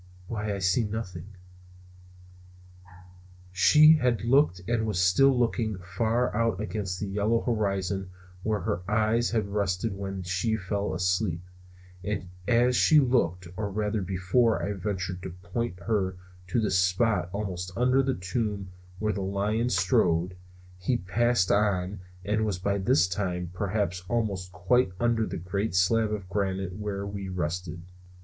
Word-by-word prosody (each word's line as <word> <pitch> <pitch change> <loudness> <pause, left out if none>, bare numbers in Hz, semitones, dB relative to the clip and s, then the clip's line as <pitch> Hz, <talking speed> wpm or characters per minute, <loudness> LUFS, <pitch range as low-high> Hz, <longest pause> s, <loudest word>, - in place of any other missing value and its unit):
"Why, 105 -1 -3
I - - -3
see 95 +5 +2
nothing." 100 -5 -5 2.2
She 150 - +7
had 120 -6 +1
looked 120 -6 +3
and 115 -2 0
was 105 -5 -1
still 125 +10 +4
looking 115 -3 0
far 110 +7 -1
out 115 -4 +1
against 105 -3 -3
the - - -2
yellow 105 +4 +1
horizon 100 -4 -1 0.3
where 105 0 -1
her 95 -2 -2
eyes 110 +2 +2
had 110 -3 -1
rested 100 0 -1
when 95 -1 -5
she 90 +6 0
fell 100 0 -2
asleep. 90 -1 0 0.6
And 100 -3 -3 0.2
as 125 +1 +3
she 155 +4 +6
looked, 90 - +1
or 105 +1 -3
rather 105 +1 -1
before 95 +6 +1
I 105 - -1
ventured 95 -2 -3
to 95 - -5
point 95 +3 -4
her 95 -2 -1 0.3
to 90 - 0
the 110 - 0
spot 90 0 +2
almost 95 -3 -4
under 125 +2 +3
the 135 0 0
tomb 100 +1 -3 0.3
where 105 +2 0
the 100 - -3
lion 105 +5 0
strode, 90 -2 +2 0.4
he 120 +7 0
passed 115 +1 +1
on 100 -1 +1 0.3
and 105 +2 +1
was 105 -4 -1
by 100 +2 -1
this 90 -2 +3
time 90 -2 -3
perhaps 95 -2 -2
almost 100 -6 -1
quite 95 +4 +1
under 120 -2 +1
the - - -4
great 95 +3 -2
slab 105 +4 +3
of 100 -3 -4
granite 95 -2 -2
where 100 -1 -4
we 100 -1 -5
rested. 85 -1 -3
100 Hz, 145 wpm, -27 LUFS, 90-110 Hz, 2.2 s, She